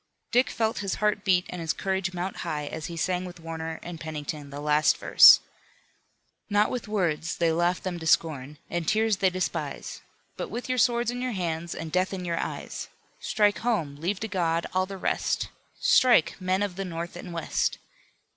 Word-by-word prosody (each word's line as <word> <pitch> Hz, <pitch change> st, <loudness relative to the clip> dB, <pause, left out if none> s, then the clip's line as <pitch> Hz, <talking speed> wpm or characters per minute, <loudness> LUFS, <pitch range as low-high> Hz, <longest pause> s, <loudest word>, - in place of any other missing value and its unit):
Dick 250 Hz, +2 st, +4 dB
felt 220 Hz, 0 st, -1 dB
his 195 Hz, -2 st, -2 dB
heart 210 Hz, -1 st, 0 dB
beat 180 Hz, -2 st, +3 dB
and 180 Hz, -, -5 dB
his 160 Hz, -1 st, 0 dB
courage 190 Hz, -1 st, -1 dB
mount 180 Hz, +1 st, -4 dB
high, 150 Hz, -3 st, -3 dB
as 155 Hz, +1 st, -5 dB
he 170 Hz, -1 st, -7 dB
sang 180 Hz, +1 st, 0 dB
with 180 Hz, -1 st, -9 dB
Warner 160 Hz, 0 st, -5 dB
and 170 Hz, -1 st, -7 dB
Pennington 150 Hz, -2 st, -5 dB
the 140 Hz, +1 st, -7 dB
last 150 Hz, +1 st, +3 dB
verse: -, -, +8 dB, 1.1 s
"Not 205 Hz, +1 st, +3 dB
with 245 Hz, -3 st, -4 dB
words; 175 Hz, -6 st, -1 dB
they 170 Hz, -1 st, +2 dB
laugh 175 Hz, +2 st, +1 dB
them 180 Hz, -2 st, -3 dB
to 160 Hz, -, -5 dB
scorn, 150 Hz, -3 st, +1 dB
And 175 Hz, -2 st, -3 dB
tears 220 Hz, -1 st, +2 dB
they 190 Hz, -2 st, +3 dB
despise. 185 Hz, 0 st, -4 dB, 0.4 s
But -, -, -4 dB
with 250 Hz, +1 st, -1 dB
swords 240 Hz, -1 st, +2 dB
in 245 Hz, 0 st, -5 dB
your 255 Hz, -1 st, -2 dB
hands 170 Hz, -3 st, -3 dB
And 165 Hz, -1 st, -6 dB
death 185 Hz, +2 st, +1 dB
in 180 Hz, -1 st, -5 dB
your 170 Hz, -1 st, -1 dB
eyes! -, -, -5 dB, 0.3 s
Strike 210 Hz, -1 st, +2 dB
home! 205 Hz, -12 st, -1 dB
Leave 180 Hz, +6 st, -2 dB
to 220 Hz, -, -2 dB
God 170 Hz, -4 st, 0 dB
all 185 Hz, 0 st, +1 dB
the 195 Hz, 0 st, -7 dB
rest; -, -, -1 dB, 0.3 s
Strike! 200 Hz, -10 st, +5 dB
Men 185 Hz, +2 st, +1 dB
of 195 Hz, -3 st, -4 dB
the 195 Hz, -, -2 dB
North 170 Hz, -1 st, -5 dB
and 175 Hz, 0 st, -8 dB
West!" 165 Hz, -1 st, -1 dB
180 Hz, 190 wpm, -27 LUFS, 165-205 Hz, 1.1 s, verse